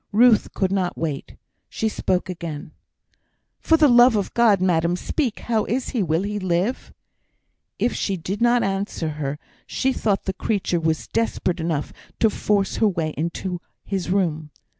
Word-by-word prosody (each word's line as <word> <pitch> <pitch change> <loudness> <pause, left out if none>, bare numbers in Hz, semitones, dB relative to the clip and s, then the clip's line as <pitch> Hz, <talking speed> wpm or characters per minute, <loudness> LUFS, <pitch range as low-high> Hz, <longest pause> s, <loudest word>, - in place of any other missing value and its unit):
Ruth 225 0 +5
could 190 -1 0
not 185 -2 -1
wait; 150 -4 -4 0.3
she 220 - -1
spoke 190 -4 -1
again: 165 -4 -6 0.9
"For 325 - +3
the 310 -2 +6
love 240 -1 +6
of 200 -2 -1
God, 225 -5 +4
madam, 175 -2 +2
speak! 245 - -2
How 225 -2 0
is 250 +2 -2
he? 240 - -1
Will 165 0 +1
he 205 +1 -2
live?" 185 +6 -1 0.9
If 240 - +1
she 195 -2 -1
did 190 +6 -4
not 240 0 +4
answer 195 -4 -2
her, 150 -2 -3 0.3
she 265 0 0
thought 205 -5 0
the 190 - -2
creature 190 -4 -1
was 160 -1 -1
desperate 190 -5 -1
enough 160 -3 -2 0.3
to 220 - +4
force 200 -2 0
her 220 - +4
way 165 -5 -1
into 170 +2 -3 0.2
his 195 -3 -3
room. 165 -5 0
190 Hz, 160 wpm, -23 LUFS, 170-220 Hz, 0.9 s, the